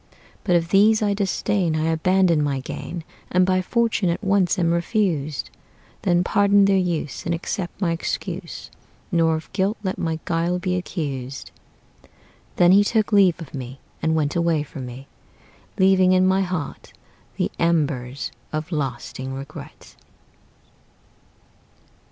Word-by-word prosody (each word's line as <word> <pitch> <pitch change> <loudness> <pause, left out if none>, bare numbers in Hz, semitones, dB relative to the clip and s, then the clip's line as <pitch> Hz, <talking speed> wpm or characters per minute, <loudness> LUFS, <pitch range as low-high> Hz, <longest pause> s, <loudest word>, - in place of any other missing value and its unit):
But 180 -3 +2
if 165 -1 +1
these 215 +3 +5
I 205 -1 +2
disdain, 195 -3 0
I 160 +1 +1
abandon 175 0 +3
my 140 -2 0
gain, 165 +5 -6 0.3
And 180 +1 +3
by 185 0 +2
fortune 225 -2 +1
at 170 +5 -2
once 195 -2 +2
am 170 -2 +2
refused: 170 - -1 0.5
Then 175 -2 +2
pardon 200 +1 +4
their 195 0 +3
use, 170 -6 -2
And 170 +1 -1
accept 175 +2 -4
my 180 -4 +1
excuse, 165 - -4 0.4
Nor 165 -2 +3
of 160 - -8
guilt 200 +3 0
let 190 -1 -2
my 165 -2 -1
guile 170 +1 0
be 180 0 -1
accused." 140 -8 -4 1.0
Then 175 0 +5
he 200 +2 +7
took 215 0 +1
leave 190 -5 +5
of 165 -5 -10
me, 130 -1 -7 0.2
and 160 0 +1
went 150 -2 0
away 170 -3 +1
from 135 -3 -8
me, 125 +2 -9 0.7
Leaving 190 -1 +5
in 185 0 +4
my 190 +1 +3
heart 180 -6 -4 0.4
the - - 0
embers 145 -6 0 0.2
of 155 +3 -4
lasting 135 -2 -4
regret. 135 +1 -10
170 Hz, 140 wpm, -23 LUFS, 155-190 Hz, 1.0 s, he